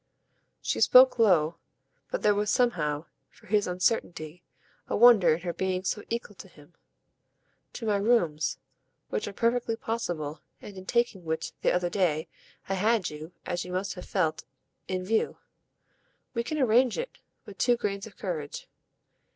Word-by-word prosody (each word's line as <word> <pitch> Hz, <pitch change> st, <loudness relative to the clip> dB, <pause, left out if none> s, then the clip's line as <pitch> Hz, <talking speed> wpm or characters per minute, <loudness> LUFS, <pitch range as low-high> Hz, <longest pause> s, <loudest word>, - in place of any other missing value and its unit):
She -, -, -1 dB
spoke 255 Hz, -1 st, +7 dB
low, 170 Hz, -7 st, +4 dB, 0.5 s
but -, -, -3 dB
there 210 Hz, -, +5 dB
was 205 Hz, 0 st, 0 dB
somehow, 165 Hz, -, +1 dB, 0.2 s
for -, -, -22 dB
his 205 Hz, +1 st, +1 dB
uncertainty, 180 Hz, -3 st, -1 dB, 0.5 s
a -, -, -1 dB
wonder 210 Hz, -9 st, +7 dB
in 165 Hz, -, -8 dB
her 175 Hz, -1 st, -3 dB
being 185 Hz, 0 st, -1 dB
so 210 Hz, +2 st, -1 dB
equal 235 Hz, -2 st, -4 dB
to -, -, -10 dB
him. 150 Hz, -2 st, -19 dB, 1.0 s
"To 230 Hz, -, -6 dB
my 210 Hz, -2 st, +2 dB
rooms, 200 Hz, -8 st, +1 dB, 0.5 s
which 105 Hz, -, -2 dB
are -, -, -4 dB
perfectly 235 Hz, +2 st, 0 dB
possible, 175 Hz, -10 st, -4 dB, 0.2 s
and 205 Hz, -, -11 dB
in 185 Hz, 0 st, -10 dB
taking 235 Hz, -6 st, 0 dB
which, 160 Hz, 0 st, -3 dB
the -, -, +3 dB
other 180 Hz, -1 st, 0 dB
day, 170 Hz, -4 st, +1 dB, 0.4 s
I 195 Hz, -, -1 dB
had 210 Hz, 0 st, +1 dB
you, 155 Hz, +3 st, -9 dB
as 175 Hz, 0 st, -2 dB
you 180 Hz, -, -8 dB
must 190 Hz, +2 st, -2 dB
have 180 Hz, -, -9 dB
felt, 160 Hz, -5 st, 0 dB, 0.4 s
in 185 Hz, -1 st, -3 dB
view. 220 Hz, +3 st, 0 dB, 1.0 s
We 235 Hz, -2 st, -1 dB
can 310 Hz, +6 st, -3 dB
arrange 250 Hz, -2 st, +3 dB
it -, -, -5 dB, 0.3 s
with 205 Hz, -2 st, -12 dB
two 245 Hz, -1 st, +3 dB
grains 200 Hz, -2 st, -3 dB
of 210 Hz, -, -16 dB
courage. 160 Hz, -7 st, -5 dB
195 Hz, 160 wpm, -28 LUFS, 170-225 Hz, 1.0 s, spoke